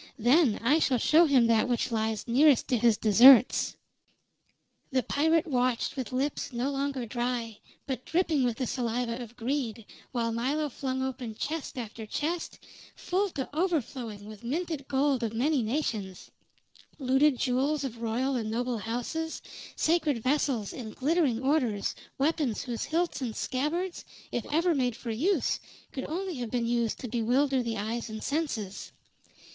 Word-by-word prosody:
Then 245 Hz, +1 st, +4 dB
I 290 Hz, +7 st, +4 dB
shall 265 Hz, -5 st, +2 dB
show 315 Hz, +7 st, +5 dB
him 265 Hz, -5 st, +5 dB
that 230 Hz, +1 st, +3 dB
which 240 Hz, 0 st, 0 dB
lies 220 Hz, -1 st, -1 dB
nearest 270 Hz, +2 st, +4 dB
to 250 Hz, -, +3 dB
his 230 Hz, -2 st, +4 dB
deserts." 240 Hz, +4 st, +6 dB, 1.2 s
The 260 Hz, -1 st, +1 dB
pirate 320 Hz, +5 st, +2 dB
watched 250 Hz, -5 st, 0 dB
with 260 Hz, -2 st, -4 dB
lips 270 Hz, +3 st, -2 dB
no 250 Hz, +3 st, -1 dB
longer 275 Hz, -2 st, -2 dB
dry, 240 Hz, -2 st, -3 dB, 0.3 s
but 260 Hz, -2 st, -4 dB
dripping 325 Hz, -5 st, +1 dB
with 240 Hz, -2 st, 0 dB
the 255 Hz, -, -1 dB
saliva 240 Hz, 0 st, -2 dB
of 240 Hz, 0 st, -9 dB
greed, 235 Hz, -3 st, -3 dB, 0.3 s
while 230 Hz, -2 st, -1 dB
Milo 280 Hz, +6 st, -1 dB
flung 260 Hz, 0 st, -3 dB
open 255 Hz, -4 st, -4 dB
chest 305 Hz, +3 st, -4 dB
after 225 Hz, -2 st, -6 dB
chest, 325 Hz, +9 st, -3 dB, 0.4 s
full 390 Hz, +3 st, 0 dB
to 270 Hz, -7 st, -4 dB
overflowing 255 Hz, -, -2 dB
with 215 Hz, +1 st, -11 dB
minted 305 Hz, +2 st, -3 dB
gold 275 Hz, -1 st, +1 dB
of 225 Hz, -2 st, -2 dB
many 275 Hz, +3 st, +2 dB
nations; 215 Hz, -6 st, -3 dB, 0.7 s
looted 270 Hz, +1 st, +3 dB
jewels 270 Hz, +4 st, 0 dB
of 235 Hz, -4 st, -5 dB
royal 245 Hz, +4 st, 0 dB
and 225 Hz, -3 st, -2 dB
noble 240 Hz, +1 st, -1 dB
houses, 245 Hz, +9 st, -3 dB, 0.4 s
sacred 310 Hz, -8 st, +1 dB
vessels 255 Hz, -6 st, 0 dB
and 220 Hz, -4 st, -7 dB
glittering 275 Hz, -4 st, +1 dB
orders, 255 Hz, -8 st, +1 dB, 0.2 s
weapons 285 Hz, -5 st, 0 dB
whose 240 Hz, -4 st, -3 dB
hilts 335 Hz, -2 st, -1 dB
and 235 Hz, -4 st, -3 dB
scabbards, 325 Hz, +7 st, -2 dB, 0.3 s
if 240 Hz, -, -3 dB
ever 335 Hz, +3 st, +3 dB
made 250 Hz, -5 st, 0 dB
for 235 Hz, -, -5 dB
use, 325 Hz, -, +1 dB, 0.3 s
could 265 Hz, -, -5 dB
only 360 Hz, +1 st, -3 dB
have 240 Hz, -2 st, -4 dB
been 240 Hz, 0 st, -1 dB
used 235 Hz, -1 st, 0 dB
to 255 Hz, -, -6 dB
bewilder 250 Hz, +4 st, +1 dB
the 230 Hz, -2 st, -3 dB
eye 220 Hz, +4 st, -2 dB
and 220 Hz, -1 st, -7 dB
senses. 275 Hz, -11 st, -3 dB
255 Hz, 155 wpm, -29 LUFS, 230-290 Hz, 1.2 s, deserts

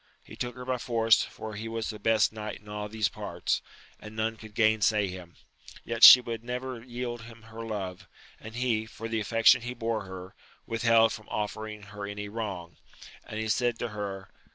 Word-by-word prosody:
He -, -, -12 dB
took 125 Hz, -1 st, -4 dB
her 125 Hz, 0 st, -8 dB
by 130 Hz, -1 st, -1 dB
force, 115 Hz, -2 st, +3 dB
for 110 Hz, -1 st, -6 dB
he 110 Hz, +2 st, -5 dB
was 115 Hz, 0 st, -3 dB
the 105 Hz, -, -9 dB
best 110 Hz, 0 st, +3 dB
knight 105 Hz, -2 st, -6 dB
in 105 Hz, -, -21 dB
all 105 Hz, 0 st, -5 dB
these 110 Hz, -1 st, +1 dB
parts, -, -, -2 dB, 0.4 s
and 105 Hz, 0 st, -10 dB
none 110 Hz, 0 st, -1 dB
could 110 Hz, -1 st, -13 dB
gainsay 110 Hz, -2 st, +3 dB
him, 90 Hz, -2 st, -9 dB, 0.5 s
yet 115 Hz, -, -3 dB
would 115 Hz, -, -2 dB
she 125 Hz, -, +12 dB, 0.2 s
never 125 Hz, 0 st, -5 dB
yield 120 Hz, -1 st, -5 dB
him 115 Hz, -1 st, -13 dB
her 115 Hz, +1 st, -9 dB
love; 95 Hz, -5 st, -5 dB, 0.3 s
and 110 Hz, +1 st, -10 dB
he, 115 Hz, -3 st, 0 dB
for 115 Hz, 0 st, -7 dB
the 115 Hz, 0 st, -1 dB
affection 115 Hz, +3 st, +5 dB
he 125 Hz, +1 st, -5 dB
bore 115 Hz, -3 st, -2 dB
her, 95 Hz, 0 st, -9 dB, 0.3 s
withheld 115 Hz, -1 st, +3 dB
from 110 Hz, -2 st, -10 dB
offering 105 Hz, 0 st, -4 dB
her 100 Hz, 0 st, -7 dB
any 105 Hz, 0 st, -5 dB
wrong; 100 Hz, -7 st, -5 dB, 0.5 s
and 110 Hz, -, -5 dB
he 110 Hz, -, -2 dB
said 120 Hz, +2 st, +1 dB
to 120 Hz, -, -3 dB
her. 100 Hz, -3 st, -6 dB
110 Hz, 195 wpm, -28 LUFS, 105-115 Hz, 0.5 s, she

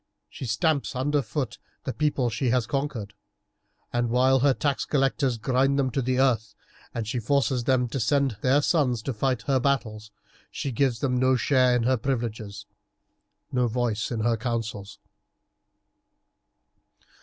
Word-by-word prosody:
She -, -, -7 dB
stamps 145 Hz, +4 st, 0 dB
under 145 Hz, +3 st, +1 dB
foot 130 Hz, -4 st, -4 dB, 0.2 s
the 130 Hz, -, -3 dB
people 145 Hz, -5 st, 0 dB
she 125 Hz, +2 st, -1 dB
has 125 Hz, -1 st, +2 dB
conquered, 120 Hz, -5 st, -3 dB, 0.8 s
and 120 Hz, -1 st, 0 dB
while 130 Hz, +2 st, +4 dB
her 140 Hz, +2 st, +4 dB
tax 145 Hz, -3 st, 0 dB
collectors 135 Hz, -3 st, +1 dB
grind 130 Hz, +4 st, +1 dB
them 130 Hz, -2 st, +1 dB
to 135 Hz, -, -1 dB
the 130 Hz, +1 st, 0 dB
earth, 110 Hz, -5 st, +1 dB, 0.4 s
and 115 Hz, -3 st, -4 dB
she 125 Hz, +2 st, -2 dB
forces 130 Hz, 0 st, +1 dB
them 130 Hz, -2 st, +2 dB
to 135 Hz, -, -3 dB
send 135 Hz, 0 st, +1 dB
their 135 Hz, +3 st, +3 dB
sons 130 Hz, -10 st, +1 dB
to 135 Hz, -, -2 dB
fight 125 Hz, 0 st, -1 dB
her 135 Hz, -2 st, +2 dB
battles, 115 Hz, -5 st, -1 dB, 0.4 s
she 140 Hz, -, -4 dB
gives 125 Hz, -1 st, 0 dB
them 125 Hz, -3 st, +1 dB
no 130 Hz, 0 st, +3 dB
share 130 Hz, 0 st, +3 dB
in 120 Hz, -, +1 dB
her 130 Hz, +2 st, +2 dB
privileges, 115 Hz, -5 st, -3 dB, 0.9 s
no 125 Hz, -1 st, +1 dB
voice 115 Hz, -2 st, -1 dB
in 115 Hz, -3 st, -2 dB
her 115 Hz, +1 st, +1 dB
councils. 110 Hz, -3 st, -4 dB
125 Hz, 155 wpm, -26 LUFS, 115-135 Hz, 0.9 s, while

